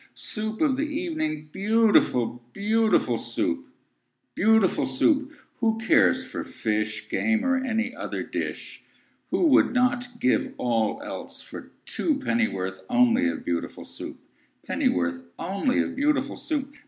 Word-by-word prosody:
Soo 215 0 -3
oop 220 - -10
of 280 -5 +3
the 285 - 0
e 305 +3 -2
e - - -3
evening, 155 - -3
Beautiful, 200 - +2
beautiful 220 +2 +2
Soup! 300 -3 -2 0.7
Beautiful 220 -3 +3
Soup! 275 - +2 0.3
Who 225 -2 +1
cares 155 - +3
for - - -5
fish, 105 -1 -2
Game, 225 +2 +1
or 265 0 +2
any 240 -1 -1
other - - -4
dish? - - -5 0.5
Who - - +2
would 265 - +4
not 245 -1 +1
give 125 - +1
all 115 -3 0
else - - -6
for - - -10 0.2
two 310 -5 0
Pennyworth 95 - -1
only 120 -7 +4
of 85 - -5
Beautiful 85 -1 -3
Soup? - - -8 0.5
Pennyworth 85 0 0 0.2
only 195 +9 0
of 265 - -5
beautiful 295 +2 +1
Soup? 285 -3 -3
225 Hz, 140 wpm, -26 LUFS, -, 0.7 s, would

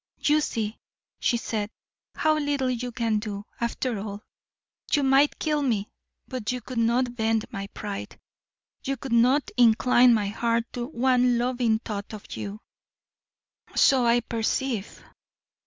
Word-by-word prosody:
"You 300 +1 +4
see," 220 -6 -3 0.4
she 240 - +2
said, 215 -2 -3 0.5
"how 310 0 +2
little 285 -3 0
you 245 0 -3
can 230 -3 0
do, 205 -1 -6
after 235 -1 -2
all. 205 0 -6 0.7
You 290 - +3
might 270 +2 +4
kill 300 -2 0
me, 220 -7 0 0.4
but 250 -4 -3
you 250 - -3
could 250 -1 -5
not 240 +2 +1
bend 220 -1 +1
my 195 0 -5
pride; 200 0 -7 0.6
you 275 0 -2
could 250 0 -5
not 250 +5 +3
incline 245 +1 +5
my 205 -2 0
heart 230 +2 0
to 240 -1 -3
one 250 -2 +2
loving 240 -2 +1
thought 210 -1 -6
of 210 - -9
you." 205 +1 -6 1.1
"So 265 -3 +5
I 235 +1 +4
perceive. 230 -1 -2
235 Hz, 140 wpm, -26 LUFS, 220-255 Hz, 1.1 s, incline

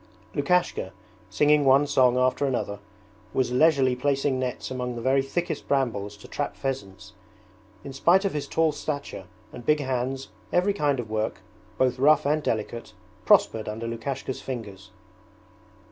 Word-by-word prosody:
Lukashka, 145 - 0 0.4
singing 150 0 +3
one 135 +1 +5
song 130 -3 +3
after 130 +2 +2
another, 105 -6 -2 0.6
was 130 -2 +1
leisurely 135 -1 +4
placing 135 0 0
nets 130 0 -4
among 125 -1 -3
the 120 - -5
very 135 +1 +3
thickest 170 +6 -3
brambles 110 -7 -1
to 105 - -13
trap 145 - -3
pheasants. 100 -9 -5 0.7
In 140 - -8
spite 175 +8 +3
of 195 - 0
his 150 -1 -3
tall 160 -1 +2
stature 140 -11 -5 0.3
and 120 - -9
big 150 +4 +3
hands 130 0 -2 0.2
every 185 +3 +2
kind 145 -8 0
of 110 -3 -5
work, 110 -2 -2 0.4
both 130 0 +1
rough 150 +2 +5
and 150 +2 +2
delicate, 115 -2 -3 0.3
prospered 110 -1 +4
under 110 +2 -5
Lukashka's 125 +3 -4
fingers. 100 -6 -7
130 Hz, 145 wpm, -26 LUFS, 120-145 Hz, 0.7 s, one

